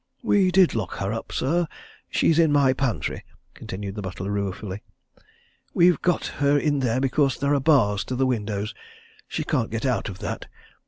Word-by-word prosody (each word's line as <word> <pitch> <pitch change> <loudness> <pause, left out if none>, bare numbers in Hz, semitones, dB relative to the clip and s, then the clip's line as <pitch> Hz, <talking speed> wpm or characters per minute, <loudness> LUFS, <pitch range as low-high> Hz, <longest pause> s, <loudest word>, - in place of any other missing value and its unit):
"We 200 -5 +3
did 185 -1 +4
lock 110 -6 -3
her 100 +2 -2
up, 115 - -6
sir! 170 +5 0 0.4
She's 165 0 +2
in 160 -3 +4
my 140 -3 +4
pantry," 130 -3 -2 0.3
continued 100 +1 -6
the 105 - -5
butler, 95 +1 -5
ruefully. 100 0 -3 0.9
"We've 175 -2 +4
got 180 -2 +1 0.2
her 145 0 +4
in 145 0 +1
there 125 -1 +1
because 135 0 +1
there 140 +1 +1
are 140 - +3
bars 125 -9 +3
to 130 - -3
the 130 +1 +2
windows 105 -3 -2 0.5
she - - -3
can't 115 -3 0
get 115 +4 -3
out 125 -4 0
of 95 - -8
that. - - -5
130 Hz, 175 wpm, -24 LUFS, 105-145 Hz, 0.9 s, did